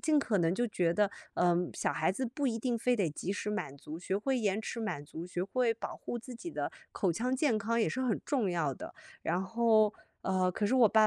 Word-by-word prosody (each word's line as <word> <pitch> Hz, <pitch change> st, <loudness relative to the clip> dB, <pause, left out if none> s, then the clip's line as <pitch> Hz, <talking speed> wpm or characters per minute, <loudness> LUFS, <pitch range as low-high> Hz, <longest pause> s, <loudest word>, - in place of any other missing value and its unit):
尽 310 Hz, -3 st, +4 dB
可 225 Hz, -7 st, +1 dB
能 170 Hz, -1 st, +3 dB
就 240 Hz, +4 st, +1 dB
觉 180 Hz, -6 st, +1 dB
得， 205 Hz, 0 st, +3 dB, 0.2 s
嗯， 175 Hz, 0 st, +2 dB
小 -, -, 0 dB
孩 -, -, +2 dB
子 260 Hz, +8 st, -2 dB
不 275 Hz, +4 st, -2 dB
一 230 Hz, -2 st, 0 dB
定 240 Hz, +1 st, 0 dB
非 250 Hz, +1 st, +2 dB
得 195 Hz, -5 st, +2 dB
即 165 Hz, +5 st, -4 dB
时 205 Hz, +1 st, -3 dB
满 165 Hz, -10 st, -3 dB
足， 150 Hz, +3 st, -8 dB
学 190 Hz, +1 st, -1 dB
会 265 Hz, +5 st, +1 dB
延 210 Hz, -2 st, +1 dB
迟 230 Hz, +1 st, -4 dB
满 175 Hz, -10 st, -3 dB
足， 160 Hz, +3 st, -7 dB
学 180 Hz, 0 st, -2 dB
会 240 Hz, +3 st, +2 dB
保 230 Hz, -, -5 dB
护 240 Hz, -, -4 dB
自 250 Hz, +1 st, -9 dB
己 345 Hz, +9 st, -6 dB
的 -, -, -3 dB, 0.2 s
口 185 Hz, -5 st, +1 dB
腔 250 Hz, +8 st, 0 dB
健 260 Hz, -5 st, +3 dB
康， 230 Hz, +3 st, 0 dB
也 -, -, +3 dB
是 260 Hz, -, -2 dB
很 235 Hz, -5 st, +1 dB
重 250 Hz, -10 st, +1 dB
要 155 Hz, -6 st, 0 dB
的。 -, -, -8 dB, 0.3 s
然 180 Hz, -, +1 dB
后， 220 Hz, +1 st, +4 dB, 0.3 s
呃， 185 Hz, -1 st, +2 dB
可 205 Hz, +3 st, 0 dB
是 250 Hz, -, +2 dB
我 240 Hz, -4 st, +7 dB
爸 220 Hz, +1 st, +5 dB
215 Hz, 265 characters per minute, -32 LUFS, 180-240 Hz, 0.3 s, 我